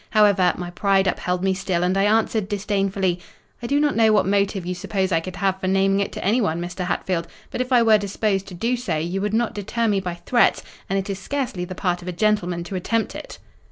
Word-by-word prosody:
However, 205 -4 +4
my 175 -1 -5
pride 195 +1 +2
upheld 180 0 -1
me 190 0 +2
still, 185 -2 -1
and 180 +1 +1
I 195 +1 +3
answered 215 -1 +1
disdainfully; 195 -3 0 0.4
'I 235 - -4
do 285 +4 +2
not 295 -1 +2
know 220 -1 +5
what 210 - +3
motive 200 -1 0
you 180 - -2
suppose 190 +1 -2
I 165 - +3
could 180 +2 -7
have 190 0 0
for 185 - -1
naming 195 +1 +2
it 200 - -1
to - - -5
anyone, 200 -6 +1
Mr. 175 +1 -4
Hatfield; 175 -2 -1 0.2
but - - -2
if 255 +1 -4
I 245 -2 +5
were 220 -2 +5
disposed 200 -1 -1
to 185 - -9
do 230 +7 0
so, 195 -10 -2
you 175 +5 -2
would 210 0 -1
not 235 0 +1
deter 225 +3 -2
me 205 -2 +2
by 180 -2 -4
threats; 235 +5 +2 0.3
and 195 - +1
it 195 - -2
is 195 -1 -4
scarcely 240 -5 -3
the 185 - -7
part 180 -2 -1
of 175 - -11
a - - -1
gentleman 180 -3 0
to 175 +3 -6
attempt 225 +5 -1
it. - - -8
195 Hz, 240 wpm, -22 LUFS, 180-215 Hz, 0.4 s, know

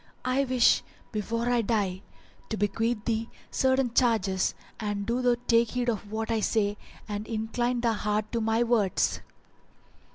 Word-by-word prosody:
I 260 +2 +2
wish, 250 -2 +4 0.3
before 230 +2 -2
I 240 -1 +3
die, 200 -4 0 0.5
to 220 - -2
bequeath 215 +2 0
thee 225 0 -1 0.2
certain 260 -2 +2
charges 215 -7 +2 0.2
and 205 -2 -2
do 240 +3 0
thou 245 -1 +3
take 230 -1 +4
heed 245 -1 0
of 210 -2 -3
what 220 +1 -2
I 225 - +2
say 205 -1 +1 0.3
and 210 +1 -4
incline 240 +2 -1
thy 235 -1 +2
heart 210 0 -1
to 235 - 0
my 225 +2 +2
words." 225 -5 +1
225 Hz, 155 wpm, -28 LUFS, 210-240 Hz, 0.5 s, wish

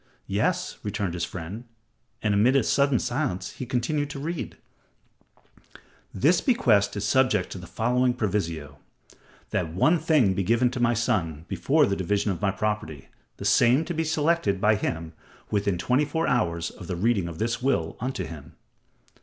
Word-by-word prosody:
"Yes," - - -1
returned 100 -3 -3
his 85 -1 -2
friend, 95 +7 -7 0.6
and 105 -2 +2
amid 115 +6 +4
a 135 - +4
sudden 140 -2 +2
silence, 120 -10 -2
he 130 - -7
continued 145 +4 -1
to 150 - -6
read: 165 +3 -4 1.5
"This 160 - +3
bequest 110 - +2
is 100 - -2
subject 125 -8 +2
to 95 - -6
the 90 - -10
following 125 +4 +1
proviso: 85 - -3 0.7
that 80 -3 -1
one 155 - +3
thing 150 -11 +3
be 100 - -1
given 120 +5 +2
to 130 - -4
my 120 0 +2
son 80 -8 -1
before 150 +1 +2
the 100 - 0
division 100 +2 0
of 85 - -5
my 100 - +2
property, 100 -8 -3 0.3
the - - -7
same 125 +7 +4
to 175 - -3
be 165 0 0
selected 155 - +1
by 105 +2 +4
him 80 -5 -3 0.4
within 100 -3 +1
twenty 125 - +2
four 160 +3 -1
hours 85 - 0
of 90 - -11
the 90 - -3
reading 100 -1 +1
of 85 -2 -7
this 115 +3 -1
will 125 -12 0
unto 125 -5 -3
him." 75 -3 -10
110 Hz, 170 wpm, -26 LUFS, 90-130 Hz, 1.5 s, amid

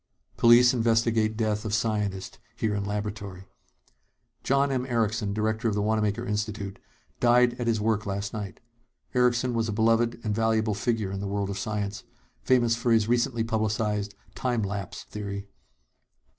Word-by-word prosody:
POLICE 120 +1 +6
INVESTIGATE 115 -2 +2
DEATH 110 -2 0
OF 110 -1 -1
SCIENTIST 105 -4 -2 0.2
HERE 110 -2 -1
IN 100 -1 -2
LABORATORY 100 -2 -5 1.0
John 140 +1 +2
M. 130 -2 0
Erickson, 110 -3 0
director 110 +3 -1
of 105 - -1
the 105 - 0
Wanamaker 110 +1 0
Institute, 105 -2 -3 0.4
died 120 0 +4
at 120 - -1
his 115 -2 +2
work 110 0 0
last 100 +1 -3
night. 105 -3 -6 0.5
Erickson 125 0 +2
was 115 -1 0
a - - 0
beloved 115 +2 +2
and 110 -2 -1
valuable 110 0 +1
figure 105 -1 -1
in 95 - -4
the 100 - -3
world 100 0 -2
of 100 - -4
science, 105 -1 -3 0.4
famous 120 -3 +3
for 120 +1 0
his 110 -2 +4
recently 120 -1 +1
publicized 110 -2 -1 0.2
"time 120 -4 -1
lapse" 100 -2 -5
theory. 100 -1 -6
110 Hz, 155 wpm, -27 LUFS, 105-115 Hz, 1.0 s, POLICE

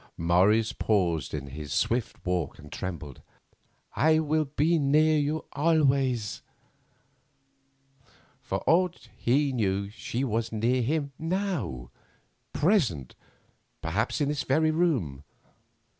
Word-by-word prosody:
Morris 95 +7 +3
paused 85 - 0
in 70 -2 -4
his 75 +1 -7
swift 120 0 -1
walk 90 -1 -1
and 75 -2 -13
trembled: 80 -8 -6 0.7
"I 155 +2 +4
will 155 0 +1
be 155 +4 +1
near 155 +2 +3
you 150 +2 -1
always." 140 -7 +1 2.0
For - - -3
aught 175 +1 +1
he 135 +3 +1
knew 100 -3 -1
she 120 +3 -4
was 115 -2 -1
near 120 +4 +1
him 140 +3 -1
now—present, 155 - -2 0.7
perhaps, - - -1
in 145 - +1
this 145 -1 -1
very 155 +4 +2
room. 130 - 0
130 Hz, 105 wpm, -27 LUFS, 95-155 Hz, 2.0 s, I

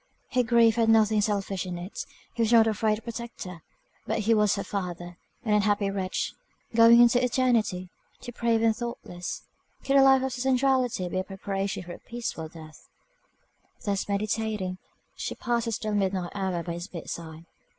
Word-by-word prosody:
Her 255 - +3
grief 235 -1 +4
had 225 -1 +3
nothing 220 -1 +4
selfish 200 -2 -1
in 180 -2 -5
it; 175 +3 -6 0.3
he 235 - -2
was 225 0 +2
not 230 -2 +7
a 220 - +1
friend 215 0 +1
or 220 - -13
protector; 230 -7 -7 0.5
but 220 - 0
he 225 +2 +3
was 210 -2 +3
her 200 - -3
father, 175 -2 -5 0.3
an 215 - +2
unhappy 205 -1 +2
wretch, 190 -2 -2 0.4
going 230 +1 +7
into 240 +1 +5
eternity, 230 -8 +1 0.3
depraved 235 -2 0
and 225 -1 +3
thoughtless. 215 -7 -6 0.4
Could 275 0 +3
a - - +8
life 270 -1 +6
of 265 -1 -2
sensuality 255 -5 +1
be 185 +1 -2
a - - -1
preparation 195 0 -3
for 175 0 -8
a - - -11
peaceful 235 -9 -5
death? 155 -1 -13 1.0
Thus 200 -1 -1
meditating, 210 -2 -1 0.4
she - - -4
passed 235 -1 -1
the 230 - -2
still 215 -1 -2
midnight 190 -3 0
hour 190 -4 -2
by 170 - -4
his 175 +2 -6
bedside. 165 -2 -7
210 Hz, 170 wpm, -27 LUFS, 185-235 Hz, 1.0 s, a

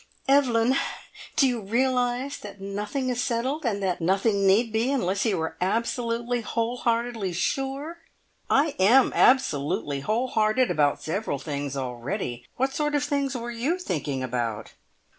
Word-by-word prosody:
"Evelyn! 260 -3 +4 0.6
Do 280 -4 +5
you 245 -3 -1
realise 250 +4 0
that 205 -1 -10
nothing 210 +7 -3
is 245 -1 -1
settled, 260 +4 -1
and 200 -3 -1
that 180 -2 -1
nothing 195 +3 +2
need 220 +4 +3
be, 230 +4 +1
unless 200 -7 0
you 205 - +1
are 160 - -3
absolutely, 235 +4 -1
whole 230 +2 -2
heartedly 230 -5 -1
sure?" 270 - -2 0.5
"I 290 +1 +3
am 240 +8 +5
absolutely 145 - +2
whole 225 - -1
hearted 220 +3 +2
about 145 -1 +1
several 165 -2 -2
things 140 -1 -4
already. 125 -1 -4
What 265 +1 0
sort 295 0 0
of 290 - +1
things 280 -2 -1
were 240 0 -5
you 255 +10 -1
thinking 145 - -3
about?" 120 -3 -3
230 Hz, 145 wpm, -26 LUFS, 185-260 Hz, 0.6 s, Do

